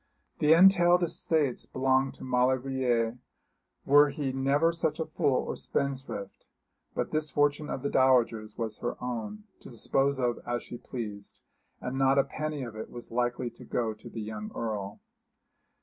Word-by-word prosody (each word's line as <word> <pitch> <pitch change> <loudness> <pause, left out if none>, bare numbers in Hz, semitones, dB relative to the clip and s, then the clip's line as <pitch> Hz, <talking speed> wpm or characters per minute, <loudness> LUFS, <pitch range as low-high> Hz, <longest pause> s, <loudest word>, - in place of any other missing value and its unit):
The 150 +1 +6
entailed 175 0 +6
estates 155 -5 0
belonged 130 +1 +1
to - - -12
Maulevrier, 125 -2 +1 0.7
were 145 +1 +6
he 140 -2 -2
never 140 +5 +2
such 160 -2 -1
a 160 - 0
fool 140 -4 +1
or - - -4
spendthrift; 135 -7 -4 0.5
but - - -2
this 155 0 -1
fortune 145 +1 +1
of 130 - -4
the 140 - 0
dowager's 120 -5 +2
was 115 -2 -3
her 120 - -3
own, 125 - -5 0.2
to - - -12
dispose 135 +3 0
of 120 -2 0
as 120 0 -3
she 120 - -9
pleased, 105 -5 -7 0.4
and 130 +2 -4
not 135 0 +4
a 140 - +6
penny 155 -2 -4
of 115 -3 -7
it 110 - -6
was 120 -1 -10
likely 120 +1 -1
to 115 - -14
go 115 -2 -1
to - - -12
the 115 - -6
young 105 0 -6
Earl. 105 -3 -4
130 Hz, 165 wpm, -29 LUFS, 120-145 Hz, 0.7 s, The